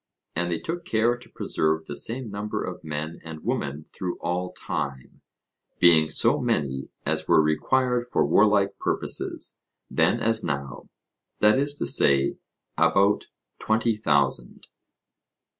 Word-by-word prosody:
And 85 +1 -1
they 85 - -1
took 170 - -5
care 115 +2 +1
to 120 - -15
preserve 80 +1 -1
the 75 - -7
same 115 - -1
number 105 +1 -4
of - - -7
men 75 +1 -5
and 80 -1 -9
women 70 +2 -3
through 90 -2 -4
all 90 +1 -3
time, 70 -2 -6 0.6
being 80 -3 +5
so - - +4
many 65 -2 -2 0.2
as - - -1
were - - +5
required 120 +11 +1
for - - +2
warlike 105 -2 +3
purposes, - - -1 0.3
then - - +2
as 115 0 +3
now 70 -4 -5 0.5
that 105 +4 +4
is 145 +1 +1
to - - -3
say, 70 -1 +4 0.4
about 100 +1 +3 0.3
twenty 110 +1 +1
thousand. 70 - 0
90 Hz, 135 wpm, -25 LUFS, 75-110 Hz, 0.6 s, being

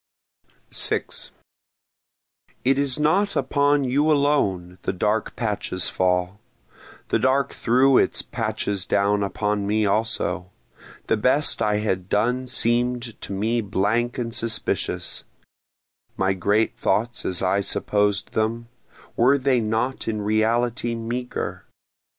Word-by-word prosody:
6 - - -1 1.4
It 135 +1 +3
is 140 -3 +1
not 185 +7 +2
upon 140 +2 +2
you 140 +4 +1
alone 100 -12 +1
the - - -2
dark 105 +4 -1
patches 105 -5 -2
fall, 90 +1 0 0.7
The - - +2
dark 130 +1 +1
threw 130 +3 +4
its - - +1
patches 105 -4 -2
down 100 +1 +2
upon 105 0 -1
me 105 +1 +1
also, 100 -4 0 0.6
The - - +1
best 130 +4 +3
I 105 -1 +2
had 95 -3 -2
done 125 +5 0
seem'd 120 -1 0
to - - -6
me 110 +4 0
blank 105 +4 0
and 115 -2 -3
suspicious, 115 -1 -1 0.9
My 95 0 +1
great 100 +4 +1
thoughts 120 +2 -1
as 90 0 +1
I 95 +2 +2
supposed 105 0 0
them, 115 +2 -2 0.5
were 130 +4 +4
they 130 -2 +2
not 115 +4 -2
in 110 -2 -2
reality 115 +3 0
meagre? 120 +2 -4
115 Hz, 120 wpm, -23 LUFS, 100-125 Hz, 1.4 s, threw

